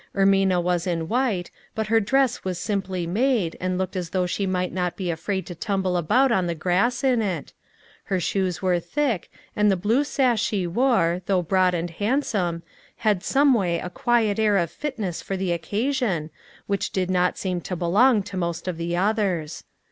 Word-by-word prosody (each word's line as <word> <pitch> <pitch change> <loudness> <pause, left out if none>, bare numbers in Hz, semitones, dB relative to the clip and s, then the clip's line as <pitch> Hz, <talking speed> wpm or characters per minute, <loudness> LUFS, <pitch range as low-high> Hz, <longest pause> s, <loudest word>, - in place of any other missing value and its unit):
Ermina 195 -2 +3
was 175 0 0
in 165 -2 -1
white, 225 -6 0 0.2
but 220 -1 -1
her 225 +2 +3
dress 260 +4 +1
was 185 -2 -3
simply 190 -4 -2
made, 215 -1 +1
and 185 0 -1
looked 190 0 -3
as 180 -2 -3
though 180 0 0
she 195 +2 -2
might 180 -1 -1
not 180 -2 -1
be 180 -3 -2
afraid 190 +4 -3
to 175 - -7
tumble 190 +1 -1
about 245 - +3
on 185 -6 +2
the 170 - -2
grass 190 - +1
in 255 -4 +3
it; 185 -8 -3 0.5
her 190 - 0
shoes 190 +1 -1
were 180 -2 +2
thick, 230 - -1 0.3
and 210 0 +3
the 195 - +3
blue 220 +10 +2
sash 255 -6 +1
she 205 -5 0
wore, 180 -4 +2
though 185 -2 +2
broad 185 +1 +2
and 170 0 -3
handsome, 200 - -1 0.3
had 210 -5 +1
some 280 0 +4
way 180 -7 +1
a 180 - -5
quiet 225 -3 +1
air 210 -2 +3
of 170 -3 0
fitness 220 - -4
for 195 - -4
the 185 -1 -1
occasion, 200 - -1 0.3
which 200 -1 -1
did 185 -1 -1
not 180 0 +1
seem 180 -2 -2
to 180 - -4
belong 205 +7 +3
to 190 - -8
most 170 -1 -3
of 180 -3 -2
the 170 +1 -2
others. 190 -6 -1
190 Hz, 190 wpm, -24 LUFS, 175-220 Hz, 0.5 s, some